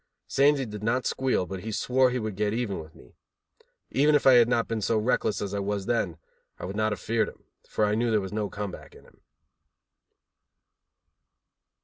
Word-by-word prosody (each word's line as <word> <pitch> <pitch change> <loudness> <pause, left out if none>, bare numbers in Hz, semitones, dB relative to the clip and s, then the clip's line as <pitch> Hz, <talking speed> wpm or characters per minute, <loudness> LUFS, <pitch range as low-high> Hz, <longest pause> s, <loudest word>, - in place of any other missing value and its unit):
Sandy 140 0 +3
did 105 -2 -7
not 125 +3 0
squeal, 130 -8 0
but 95 +1 -6
he 110 +4 -6
swore 125 +4 +2
he 125 - -2
would 110 -4 -3
get 105 +1 0
even 115 -6 -2
with 80 -1 -11
me. 60 - -17 0.8
Even 150 +2 +4
if 145 - +2
I 135 - +8
had 120 -1 +6
not 115 -2 +1
been 115 -1 -2
so 110 +2 +1
reckless 110 -2 0
as 100 0 -4
I 100 - -1
was 100 0 -2
then, 100 -9 -1 0.4
I - - -6
would 95 +2 -5
not 110 0 +1
have 105 - -3
feared 115 +4 0
him, - - -18 0.3
for 105 - +1
I 105 - +1
knew 115 +2 +1
there 110 -1 +3
was 95 0 -6
no 105 -1 -1
come 105 -1 -4
back - - -12
in - - -16
him. - - -23
110 Hz, 210 wpm, -27 LUFS, 100-125 Hz, 0.8 s, I